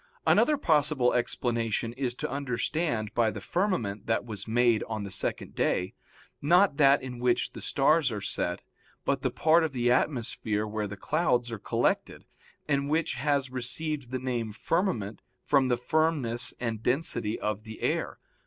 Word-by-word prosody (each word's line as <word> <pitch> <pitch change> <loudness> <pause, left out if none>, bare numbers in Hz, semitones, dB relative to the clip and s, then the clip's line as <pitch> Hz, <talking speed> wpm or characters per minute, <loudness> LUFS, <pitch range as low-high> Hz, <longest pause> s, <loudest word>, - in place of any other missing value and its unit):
Another 300 -1 +4
possible 150 - +2
explanation 115 -1 -1
is 125 -1 -2
to - - -3
understand 125 -3 -2
by 115 -2 +3
the - - -5
firmament 120 - -1
that 115 +1 0
was 105 -3 -6
made 120 -1 +3
on 110 -2 -4
the 100 - -6
second 95 - -2
day, 90 +1 0 0.5
not 175 +1 +4
that 140 -2 +5
in 125 -2 -6
which 125 0 +1
the - - -8
stars 145 0 +2
are 105 - -3
set, 90 -2 -3 0.4
but - - 0
the - - +1
part 165 +1 +3
of 155 -3 -2
the 120 -1 +1
atmosphere 115 -5 0
where 105 0 -3
the 105 0 -8
clouds 120 - 0
are 115 - -5
collected, - - -1 0.4
and 140 -1 0
which 160 +2 +1
has 135 0 0
received 130 +2 -3
the 130 - -2
name 120 -3 -2
firmament 110 - -1 0.2
from 140 -2 +3
the 125 -1 +1
firmness 135 -4 +1
and 115 -3 -3
density 120 -4 -1
of 105 -1 -2
the 110 -1 -10
air. - - -1
125 Hz, 160 wpm, -28 LUFS, 110-145 Hz, 0.5 s, that